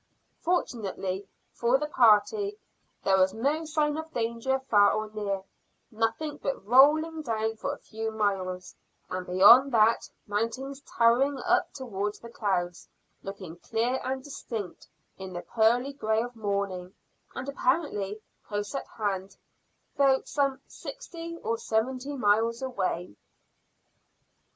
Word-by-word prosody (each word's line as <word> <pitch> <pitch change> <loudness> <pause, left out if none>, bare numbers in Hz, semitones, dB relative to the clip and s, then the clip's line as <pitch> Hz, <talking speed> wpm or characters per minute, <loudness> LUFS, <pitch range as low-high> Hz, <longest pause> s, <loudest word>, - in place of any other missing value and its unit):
Fortunately 200 - -2 0.3
for 240 +2 +2
the 300 - -2
party 300 - +3 0.5
there 190 -1 +4
was 190 +2 +3
no 290 +8 0
sign 305 -1 0
of 320 0 -6
danger 235 +2 0
far 210 -6 +4
or 215 0 -2
near 200 -3 -3 0.5
nothing 225 +7 -1
but 275 -10 -4
rolling 305 +7 +5
down 225 -4 -1
for 275 +5 -3
a 285 - -6
few 220 0 -5
miles, 195 -4 -2 0.4
and 185 0 -4
beyond 220 +9 +7
that 225 0 +4 0.2
mountains 245 +7 -3 0.2
towering 250 +4 +4
up 365 +1 +2
towards 210 -6 -4
the 235 - -11
clouds, 180 -6 -2 0.3
looking 190 -4 -8
clear 235 +7 -1
and 260 +1 -3
distinct 230 - -6 0.3
in 190 -1 -7
the 175 - -5
pearly 240 +5 +2
grey 220 -4 0
of 245 0 -7
morning, 200 -4 -3 0.4
and - - -5
apparently 250 - 0 0.3
close 205 -1 -3
at 275 - -4
hand, 195 -3 -3 0.6
though 270 -1 +5
some 275 -2 0
sixty 335 -9 -8
or 230 0 -1
seventy 255 +5 -1
miles 230 +2 +2
away. 185 - -2
230 Hz, 125 wpm, -28 LUFS, 205-275 Hz, 0.6 s, beyond